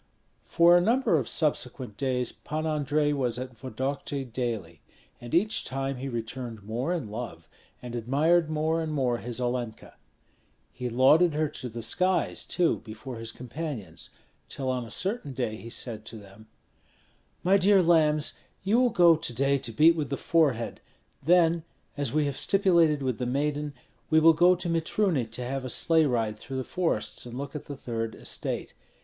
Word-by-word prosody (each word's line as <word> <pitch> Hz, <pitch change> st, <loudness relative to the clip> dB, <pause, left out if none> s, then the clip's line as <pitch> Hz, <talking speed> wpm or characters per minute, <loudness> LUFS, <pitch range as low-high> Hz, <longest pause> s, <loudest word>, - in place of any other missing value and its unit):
For 170 Hz, +1 st, +5 dB
a 175 Hz, -, +5 dB
number 230 Hz, 0 st, +2 dB
of 125 Hz, -, -4 dB
subsequent 130 Hz, -6 st, -1 dB
days 125 Hz, -1 st, -1 dB
Pan 155 Hz, +1 st, -5 dB
Andrei 150 Hz, -1 st, +1 dB
was 125 Hz, -4 st, 0 dB
at 125 Hz, -1 st, -6 dB
Vodokty 135 Hz, +3 st, -4 dB
daily; 115 Hz, -, -4 dB, 0.4 s
and 120 Hz, -, -9 dB
each 210 Hz, +7 st, +2 dB
time 135 Hz, +1 st, -3 dB
he 135 Hz, +2 st, -5 dB
returned 115 Hz, -2 st, -5 dB
more 120 Hz, -, -2 dB
in 150 Hz, -12 st, -3 dB
love, 105 Hz, -8 st, -7 dB, 0.4 s
and 120 Hz, -1 st, -7 dB
admired 150 Hz, +8 st, +2 dB
more 155 Hz, +1 st, 0 dB
and 160 Hz, -1 st, -3 dB
more 130 Hz, -5 st, 0 dB
his 120 Hz, 0 st, -5 dB
Olenka. 120 Hz, -2 st, -3 dB, 0.8 s
He 125 Hz, -1 st, -4 dB
lauded 150 Hz, +7 st, +4 dB
her 155 Hz, 0 st, +1 dB
to 125 Hz, -, -6 dB
the 115 Hz, 0 st, -6 dB
skies, 180 Hz, +11 st, +1 dB
too, 175 Hz, -2 st, +1 dB
before 115 Hz, +3 st, -8 dB
his 115 Hz, 0 st, -4 dB
companions, 125 Hz, -, -5 dB, 0.4 s
till 130 Hz, -2 st, -2 dB
on 125 Hz, -2 st, -2 dB
a -, -, -11 dB
certain 190 Hz, -, -2 dB
day 120 Hz, -4 st, -2 dB
he 115 Hz, +4 st, -9 dB
said 115 Hz, -2 st, -4 dB
to 115 Hz, -, -7 dB
them, 100 Hz, +1 st, -15 dB, 1.0 s
"My 190 Hz, +2 st, +5 dB
dear 195 Hz, 0 st, +5 dB
lambs, 155 Hz, -3 st, +3 dB, 0.3 s
you 210 Hz, +5 st, +3 dB
will 250 Hz, -1 st, +4 dB
go 175 Hz, -7 st, +6 dB
to 155 Hz, -6 st, -2 dB
day 140 Hz, +3 st, +2 dB
to 120 Hz, -, -5 dB
beat 160 Hz, +8 st, +5 dB
with 150 Hz, -4 st, -3 dB
the 140 Hz, -, -2 dB
forehead; 140 Hz, -9 st, +1 dB, 0.4 s
then, 170 Hz, +1 st, +3 dB, 0.3 s
as 145 Hz, -5 st, -2 dB
we 150 Hz, 0 st, +1 dB
have 140 Hz, -2 st, -2 dB
stipulated 170 Hz, -7 st, +3 dB
with 130 Hz, -4 st, -1 dB
the 125 Hz, -, -1 dB
maiden, 145 Hz, +2 st, -1 dB, 0.3 s
we 160 Hz, -, +5 dB
will 165 Hz, +1 st, +7 dB
go 175 Hz, +3 st, +5 dB
to 175 Hz, -, -4 dB
Mitruny 165 Hz, -, +1 dB
to 115 Hz, +3 st, -5 dB
have 135 Hz, +1 st, -3 dB
a 130 Hz, -, -5 dB
sleigh 160 Hz, +5 st, +3 dB
ride 115 Hz, -4 st, -1 dB
through 135 Hz, +3 st, -6 dB
the 130 Hz, -, -2 dB
forests 165 Hz, -8 st, -2 dB
and 120 Hz, +1 st, -7 dB
look 140 Hz, +3 st, -6 dB
at 150 Hz, -, -6 dB
the 145 Hz, -, -7 dB
third 115 Hz, -3 st, -4 dB
estate. -, -, -3 dB
135 Hz, 180 wpm, -27 LUFS, 120-160 Hz, 1.0 s, will